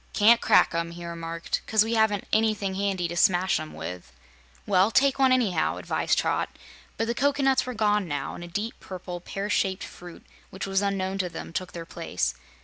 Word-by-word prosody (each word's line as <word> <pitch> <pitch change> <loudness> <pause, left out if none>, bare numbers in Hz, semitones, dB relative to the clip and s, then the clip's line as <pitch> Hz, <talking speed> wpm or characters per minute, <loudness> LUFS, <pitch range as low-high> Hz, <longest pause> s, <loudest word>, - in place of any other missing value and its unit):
"Ca'n't 230 +3 +5
crack - - +4
'em," 170 0 -1
he 170 0 -8
remarked, 165 0 -4
"'cause 220 -1 +4
we 225 +1 -2
haven't 220 -3 +2
anything 215 -3 +2
handy 190 -2 -1
to 170 - -6
smash 185 0 +3
'em 155 0 -7
with." 90 -5 -7 0.5
"Well, 190 0 +4
take 275 +4 +3
one, 265 -1 +5
anyhow," 215 -11 +2
advised - - 0
Trot; - - 0 0.5
but 225 - 0
the 235 - -1
cocoanuts 270 0 +2
were 250 - -4
gone 210 -3 +2
now, 145 -3 -3
and 175 - -8
a - - -7
deep, 205 +6 -3
purple, 180 -1 -7
pear 195 +3 -4
shaped 190 -1 0
fruit 175 -1 -11 0.2
which 190 - -5
was 195 0 +1
unknown 195 -1 -1
to 180 -2 0
them 165 - -8
took 185 +1 -4
their 170 -1 -6
place. 90 - -2
190 Hz, 195 wpm, -26 LUFS, 175-220 Hz, 0.5 s, Ca'n't